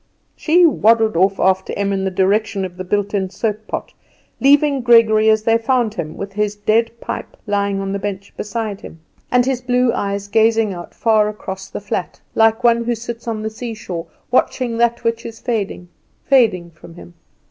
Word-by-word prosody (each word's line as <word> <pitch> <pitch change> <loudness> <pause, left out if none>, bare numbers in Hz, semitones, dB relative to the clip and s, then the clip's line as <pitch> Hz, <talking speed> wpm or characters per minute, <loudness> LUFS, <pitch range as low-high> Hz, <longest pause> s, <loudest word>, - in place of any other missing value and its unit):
She 345 +3 +4
waddled 225 - +3
off 190 +3 +2
after 190 0 +1
Em 200 0 0
in 190 0 -1
the - - +1
direction 195 +1 0
of 180 -1 -8
the 185 - -4
built 205 +2 -1
in 190 -2 -1
soap 215 +2 -3
pot, - - -5 0.5
leaving 280 0 +4
Gregory 225 -2 +5
as 215 0 +3
they 225 +1 +3
found 235 -2 +1
him, 155 -7 -6
with 200 0 -6
his 210 0 -1
dead 220 +2 +1
pipe - - -6
lying 200 -1 0
on 195 0 -3
the 200 - -2
bench 200 -1 -5
beside 210 -1 -4
him, 165 - -11 0.3
and 250 0 +3
his 260 -1 -1
blue 250 -1 +1
eyes 200 -2 -3
gazing 220 0 +2
out 175 -1 -10
far 215 -2 +2
across 190 -2 -7
the - - -6
flat, 200 -3 -4
like 225 +1 +3
one 235 -1 +4
who 240 0 0
sits 235 +1 -8
on 220 -2 -3
the 220 - -3
seashore 215 -7 -6 0.2
watching 250 -1 +1
that 235 0 +1
which 230 0 -1
is 225 -1 -8
fading, 205 -7 -3 0.4
fading 215 -11 +2
from 165 +1 -15
him. 175 0 -13
215 Hz, 190 wpm, -18 LUFS, 195-230 Hz, 0.5 s, Gregory